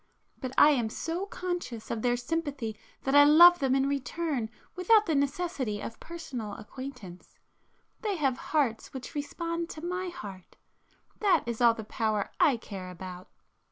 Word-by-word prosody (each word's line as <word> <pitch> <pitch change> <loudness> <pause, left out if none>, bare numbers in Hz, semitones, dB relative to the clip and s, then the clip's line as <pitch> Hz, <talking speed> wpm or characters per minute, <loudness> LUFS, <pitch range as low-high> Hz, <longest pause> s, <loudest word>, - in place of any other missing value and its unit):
But 255 -2 -4
I 300 - +8
am 240 -6 +1
so 335 - -3
conscious 350 - -4
of 230 - -2
their 245 0 +2
sympathy 275 -4 -3 0.3
that 270 - 0
I 290 0 +9
love 345 +4 +8
them 270 -1 +2
in 270 0 +2
return 275 -2 -2 0.3
without 420 +4 +4
the 325 - 0
necessity 280 -6 -1
of 225 - -7
personal 265 -11 -6
acquaintance. 220 -5 -10 0.6
They 420 -3 -1
have 275 -6 +1
hearts 270 -6 0
which 260 +3 -7
respond 335 +3 -3
to 315 +2 -7
my 365 +1 -2
heart,—that 315 - -4
is 235 0 -4
all 235 -1 +6
the 220 - -6
power 215 -1 -1
I 270 -5 +5
care 195 -5 -8
about." 180 0 -9
275 Hz, 155 wpm, -29 LUFS, 225-335 Hz, 0.6 s, I